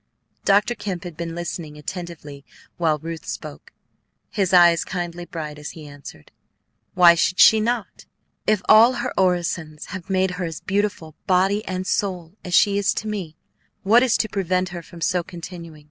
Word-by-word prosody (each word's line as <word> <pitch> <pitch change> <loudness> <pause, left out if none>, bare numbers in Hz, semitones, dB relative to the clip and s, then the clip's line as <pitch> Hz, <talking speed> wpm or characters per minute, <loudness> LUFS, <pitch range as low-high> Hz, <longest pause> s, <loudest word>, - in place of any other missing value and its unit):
Dr. 205 +4 +3
Kemp 195 -6 -5
had 175 -3 -8
been 165 0 -5
listening 170 -3 -6
attentively 150 -4 -8 0.3
while 160 -3 +1
Ruth 165 +1 -7
spoke. - - -8 0.6
His 195 -3 0
eyes 175 -2 +6
kindled 175 -1 -5
brightly 150 -3 -6
as 150 - -6
he 155 - -10
answered, 145 - -12 0.6
"Why 175 -2 +8
should 180 +2 0
she 220 - +8
not? 230 0 -3 0.4
If 215 -2 +2
all 225 +4 +7
her 245 - -3
orisons 170 -4 -1
have 185 -2 -7
made 190 -1 +1
her - - -1
as 165 -2 -5
beautiful, 200 -5 -2
body 195 +3 +2
and 185 0 -3
soul, 180 -4 -2
as 180 -2 -1
she 200 -1 +4
is 200 +1 +1
to 215 - -4
me, 190 -7 -5 0.5
what 225 +5 +5
is 255 -3 +3
to - - 0
prevent 185 -3 -1
her 175 -1 -7
from 170 0 -14
so 180 0 +1
continuing? 170 -2 -10
180 Hz, 170 wpm, -22 LUFS, 165-195 Hz, 0.6 s, Why